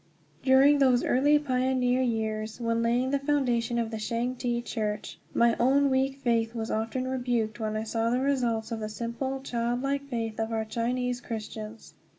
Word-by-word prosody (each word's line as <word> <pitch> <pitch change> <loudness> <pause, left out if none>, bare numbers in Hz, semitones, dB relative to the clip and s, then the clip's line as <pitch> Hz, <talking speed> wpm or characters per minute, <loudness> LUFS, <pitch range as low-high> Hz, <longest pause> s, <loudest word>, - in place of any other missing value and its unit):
During 275 +2 +5
those 255 -3 +4
early 290 +4 +4
pioneer 255 -2 +1
years, 220 -2 -2
when 230 -1 0
laying 240 +3 +1
the 280 - +1
foundation 250 -5 0
of 230 -1 -1
the 220 - -3
Changte 240 +2 -2
Church, 210 -2 -3
my 235 0 +3
own 275 +3 +4
weak 265 +1 +1
faith 230 -1 +1
was 225 -1 -3
often 225 +4 -2
rebuked 245 -4 -1
when 215 -1 -2
I 215 - -2
saw 225 +1 -1
the 245 +2 +1
results 245 -5 0
of 225 - -2
the 215 -1 -4
simple, 235 +5 -4
child 240 -1 -2
like 280 0 -1
faith 225 -3 -3
of 225 0 -1
our 220 -1 -1
Chinese 245 +2 -1
Christians. 220 -1 -7
240 Hz, 170 wpm, -28 LUFS, 225-260 Hz, -, During